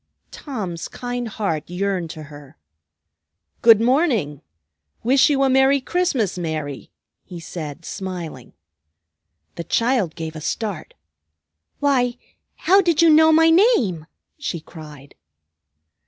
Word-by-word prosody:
Tom's 195 Hz, -, -6 dB
kind 245 Hz, -1 st, -5 dB
heart 170 Hz, -9 st, -3 dB
yearned 180 Hz, -1 st, -2 dB
to 155 Hz, 0 st, -8 dB
her. 145 Hz, -, -14 dB, 1.0 s
"Good 225 Hz, -2 st, +7 dB
morning! 230 Hz, -, +1 dB, 0.6 s
Wish 260 Hz, +5 st, +4 dB
you 275 Hz, -2 st, +2 dB
a -, -, +3 dB
merry 265 Hz, +1 st, +4 dB
Christmas, 260 Hz, -, -1 dB
Mary!" 155 Hz, -5 st, -5 dB, 0.3 s
he 180 Hz, -3 st, -10 dB
said 165 Hz, -1 st, -8 dB
smiling. 175 Hz, -9 st, -7 dB, 1.0 s
The 170 Hz, -, -4 dB
child 230 Hz, -6 st, 0 dB
gave 160 Hz, -1 st, -6 dB
a 155 Hz, -, -7 dB
start. 200 Hz, 0 st, -4 dB, 0.8 s
"Why, 255 Hz, -4 st, +1 dB, 0.5 s
how 390 Hz, +2 st, +6 dB
did 335 Hz, -3 st, +2 dB
you 330 Hz, -, +6 dB
know 315 Hz, +1 st, +6 dB
my 325 Hz, +1 st, +5 dB
name?" 260 Hz, -, +2 dB, 0.3 s
she 185 Hz, -, -4 dB
cried. 150 Hz, -4 st, -13 dB
200 Hz, 115 wpm, -21 LUFS, 160-270 Hz, 1.0 s, Good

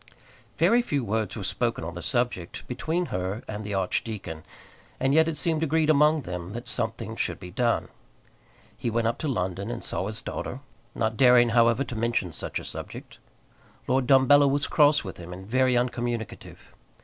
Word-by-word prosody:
Very 240 Hz, +1 st, +4 dB
few 145 Hz, -, -1 dB
words 110 Hz, -1 st, -1 dB
were -, -, -5 dB
spoken -, -, -1 dB
on 85 Hz, +1 st, -5 dB
the 90 Hz, -, -7 dB
subject 120 Hz, -5 st, -2 dB
between 165 Hz, +7 st, -2 dB
her 95 Hz, +4 st, -2 dB
and 105 Hz, 0 st, -5 dB
the 100 Hz, -1 st, -3 dB
archdeacon, 95 Hz, -3 st, -3 dB, 0.6 s
and 135 Hz, +1 st, +2 dB
yet 160 Hz, +1 st, +5 dB
it 165 Hz, -2 st, -2 dB
seemed 160 Hz, -2 st, 0 dB
agreed 160 Hz, 0 st, +3 dB
among 150 Hz, 0 st, +4 dB
them 90 Hz, +1 st, -6 dB
that 120 Hz, +2 st, -7 dB
something 115 Hz, -2 st, -3 dB
should -, -, -2 dB
be 90 Hz, -2 st, -9 dB
done. 120 Hz, +4 st, +1 dB, 0.9 s
He 120 Hz, -, -3 dB
went 115 Hz, 0 st, 0 dB
up 115 Hz, +1 st, 0 dB
to 155 Hz, -, -2 dB
London, 95 Hz, -4 st, -2 dB
and 120 Hz, 0 st, -5 dB
saw 95 Hz, -, -2 dB
his 110 Hz, +1 st, -5 dB
daughter, 130 Hz, -, -5 dB, 0.3 s
not 110 Hz, -1 st, -1 dB
daring, 125 Hz, -1 st, +6 dB
however, 115 Hz, +2 st, +4 dB
to 125 Hz, -, -7 dB
mention 110 Hz, -5 st, 0 dB
such -, -, -3 dB
a -, -, -5 dB
subject. -, -, -7 dB, 0.7 s
Lord 130 Hz, 0 st, +1 dB
Dumbello 140 Hz, +2 st, +6 dB
was 140 Hz, +1 st, +1 dB
cross 150 Hz, -1 st, +4 dB
with 95 Hz, -3 st, -7 dB
him, 90 Hz, 0 st, -9 dB
and 95 Hz, +1 st, -8 dB
very 130 Hz, +3 st, +2 dB
uncommunicative. 120 Hz, -3 st, -3 dB
120 Hz, 180 wpm, -26 LUFS, 100-135 Hz, 0.9 s, daring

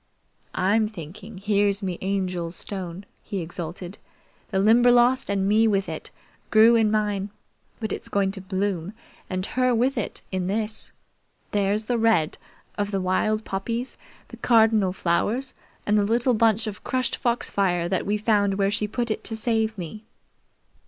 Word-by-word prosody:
"I'm 210 Hz, +4 st, +2 dB
thinking 200 Hz, +2 st, -9 dB
here's 200 Hz, 0 st, +1 dB
me 185 Hz, -3 st, -3 dB
Angel's 185 Hz, -3 st, -2 dB
stone," 190 Hz, -1 st, -6 dB, 0.2 s
he 200 Hz, -3 st, -4 dB
exulted. 175 Hz, +2 st, -6 dB, 0.5 s
"The 195 Hz, -, -1 dB
Limberlost, 240 Hz, +4 st, +5 dB
and 195 Hz, -1 st, +1 dB
me 220 Hz, +2 st, +4 dB
with 195 Hz, -2 st, +1 dB
it, -, -, -6 dB, 0.4 s
grew 225 Hz, +1 st, +6 dB
in 220 Hz, -2 st, +4 dB
mine; 210 Hz, -2 st, 0 dB, 0.5 s
but 220 Hz, -2 st, -3 dB
it's -, -, -6 dB
going 195 Hz, -1 st, +1 dB
to 195 Hz, -1 st, -6 dB
bloom, 190 Hz, -1 st, -2 dB, 0.4 s
and 185 Hz, 0 st, -1 dB
her 255 Hz, +1 st, +1 dB
with 250 Hz, +2 st, +1 dB
it, 210 Hz, -, -4 dB
in 185 Hz, -1 st, -1 dB
this! 215 Hz, +2 st, -2 dB, 0.6 s
There's 205 Hz, +1 st, +1 dB
the 240 Hz, +1 st, 0 dB
red 220 Hz, -9 st, +2 dB, 0.4 s
of 205 Hz, 0 st, 0 dB
the 195 Hz, -1 st, -1 dB
wild 215 Hz, +4 st, 0 dB
poppies, 230 Hz, +6 st, -3 dB, 0.3 s
the -, -, -10 dB
cardinal 220 Hz, -5 st, +4 dB
flowers, 210 Hz, +9 st, 0 dB, 0.3 s
and 210 Hz, 0 st, +3 dB
the -, -, +3 dB
little 235 Hz, +4 st, +2 dB
bunch 225 Hz, 0 st, +3 dB
of 215 Hz, -2 st, -6 dB
crushed 255 Hz, -1 st, -1 dB
foxfire 195 Hz, -7 st, 0 dB
that 185 Hz, +1 st, 0 dB
we 210 Hz, +1 st, +1 dB
found 205 Hz, -2 st, +2 dB
where 195 Hz, 0 st, +1 dB
she 210 Hz, 0 st, 0 dB
put 235 Hz, +2 st, -2 dB
it -, -, -3 dB
to 225 Hz, -, -3 dB
save 220 Hz, -1 st, 0 dB
me. 190 Hz, +5 st, -7 dB
205 Hz, 160 wpm, -24 LUFS, 190-225 Hz, 0.6 s, grew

